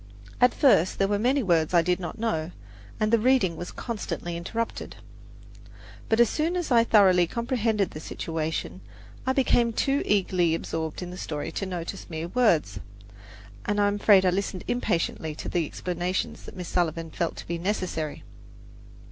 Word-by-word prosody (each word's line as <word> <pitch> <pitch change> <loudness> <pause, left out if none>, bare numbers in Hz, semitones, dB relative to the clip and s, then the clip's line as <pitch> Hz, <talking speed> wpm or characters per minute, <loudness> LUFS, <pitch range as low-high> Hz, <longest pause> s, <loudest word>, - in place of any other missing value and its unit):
At 250 0 +6
first 185 - +4
there 195 - +2
were 205 0 0
many 260 +4 +2
words 170 -3 +2
I 170 - +6
did 180 +1 +1
not 175 - -6
know, 195 -8 -1 0.5
and 215 +1 +1
the 230 - +6
reading 220 -7 +3
was 175 - -6
constantly 205 -6 -4
interrupted; 225 +7 -4 1.1
but 220 - +2
as 235 - +7
soon 320 - -1
as 350 -5 -2
I 235 -1 +6
thoroughly 190 -6 +5
comprehended 230 -3 0
the 155 - -7
situation, 160 0 -4 0.5
I 260 - +3
became 245 -3 +3
too 275 +5 +1
eagerly 180 -4 +2
absorbed 160 +1 -4
in 180 - -7
the 180 - -8
story 150 +1 -4
to 195 - -3
notice 180 +1 -6
mere 165 0 -4
words, 220 -9 +2 0.9
and 205 0 0
I 205 - +4
am 205 0 0
afraid 200 -2 +5
I 180 - +4
listened 190 -1 -2
impatiently 165 -8 -1
to - - -7
the 170 -3 0
explanations 180 +3 -3
that - - -11
Miss 180 -1 -5
Sullivan 165 -2 -1
felt 170 -2 -2
to - - -9
be 170 0 -3
necessary. 180 -5 -3
185 Hz, 170 wpm, -26 LUFS, 170-230 Hz, 1.1 s, as